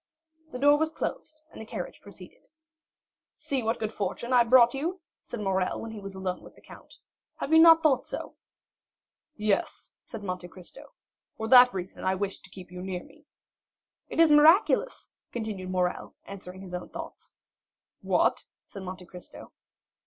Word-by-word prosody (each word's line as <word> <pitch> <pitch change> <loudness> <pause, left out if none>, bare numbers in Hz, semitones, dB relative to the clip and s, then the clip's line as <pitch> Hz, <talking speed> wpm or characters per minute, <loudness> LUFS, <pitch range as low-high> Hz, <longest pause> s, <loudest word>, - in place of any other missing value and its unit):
The - - -5
door 290 +2 +5
was 315 0 0
closed, 310 -1 -6
and - - -10
the - - -8
carriage 210 -6 -7
proceeded. 195 -3 -14 0.9
"See 270 -2 -3
what 225 +1 -1
good 220 0 -4
fortune 235 +4 -3
I 245 -1 +6
brought 240 0 +6
you!" 330 +7 -3 0.2
said 240 - -8
Morrel, 190 -2 -1
when 225 - -7
he 220 - -8
was 195 -1 -9
alone 190 -1 -4
with - - -15
the - - -19
count. - - -15 0.4
"Have 305 - -3
you 320 - +8
not 325 0 +8
thought 290 -5 +2
so?" - - -6 1.0
"Yes," 210 -2 -1
said 210 - -9
Monte 180 -2 -5
Cristo; 195 - -11 0.4
"for 220 - -4
that 250 0 +9
reason 185 -1 -7
I 190 0 +1
wished 195 0 -4
to - - -14
keep 185 -1 -12
you 180 0 -8
near 185 -1 -5
me." 310 0 -20 0.8
"It - - -4
is 330 -2 +6
miraculous!" 325 +11 +4 0.2
continued 215 -5 -5
Morrel, 180 -1 -2
answering 185 -1 -10
his 185 -2 -10
own 180 - -5
thoughts. - - -10 0.7
"What?" - - +1 0.2
said 195 - -10
Monte 185 -1 -8
Cristo. 180 0 -11
215 Hz, 165 wpm, -27 LUFS, 185-275 Hz, 1.0 s, that